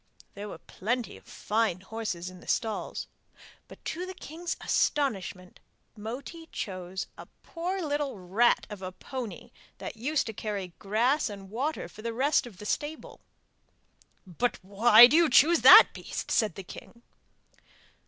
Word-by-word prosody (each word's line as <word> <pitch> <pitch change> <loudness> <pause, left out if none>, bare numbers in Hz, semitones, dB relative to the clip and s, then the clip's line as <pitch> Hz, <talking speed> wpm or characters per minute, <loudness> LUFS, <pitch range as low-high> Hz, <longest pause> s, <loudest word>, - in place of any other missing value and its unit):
There 205 +1 -7
were - - -8
plenty 230 +8 -3
of - - -16
fine 210 -4 -1
horses 190 -4 -5
in 185 - -13
the - - -17
stalls, 225 -2 -2 0.6
but - - -15
to 355 +3 -4
the 375 - -7
king's 335 0 -6
astonishment 195 -10 -1 0.4
Moti 260 +10 -8
chose 185 -1 -5
a - - -10 0.2
poor 360 +3 -4
little 290 -5 -2
rat 195 +6 +2
of 205 -2 -8
a 185 -1 -5
pony 240 +4 -7 0.3
that - - -6
was 220 - -17
used 300 +2 +1
to 220 - -5
carry 200 -4 -5
grass 235 +8 +1
and 195 -2 -10
water 275 - -2
for 205 - -13
the 230 +1 -4
rest 270 +2 +2
of 210 -6 -13
the 210 - -10
stable. 295 +8 -4 1.1
'But 210 +6 -1
why 215 +5 +8
do 255 - +3
you 335 -1 +5
choose 320 +7 +5
that - - +10
beast?' - - -6
said 215 -7 +1
the 195 - -7
king. 235 +5 -12
225 Hz, 155 wpm, -28 LUFS, 195-285 Hz, 1.1 s, that